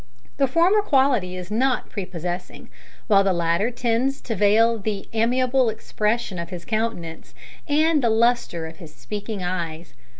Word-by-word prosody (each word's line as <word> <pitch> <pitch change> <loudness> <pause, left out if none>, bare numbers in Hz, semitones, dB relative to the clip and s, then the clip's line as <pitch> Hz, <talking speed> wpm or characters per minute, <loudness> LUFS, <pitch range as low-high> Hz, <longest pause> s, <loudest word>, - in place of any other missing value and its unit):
The 275 - +3
former 345 +10 +3
quality 265 - +2
is 180 +2 -8
not 250 +3 0
prepossessing, 180 -2 -6 0.3
while 200 -3 +4
the 195 - +2
latter 170 +5 +1
tends 245 +2 0
to 230 - -4
veil 220 +3 +3
the 200 -1 -4
amiable 250 +2 +2
expression 215 -2 -2
of 170 0 -5
his 175 -2 -8
countenance 215 -8 -3 0.3
and 310 +1 +3
the 235 - +2
lustre 225 -7 +1
of 160 0 -9
his 155 -2 -12
speaking 210 -1 -6
eyes. 170 -2 -4
220 Hz, 145 wpm, -23 LUFS, 180-245 Hz, 0.3 s, while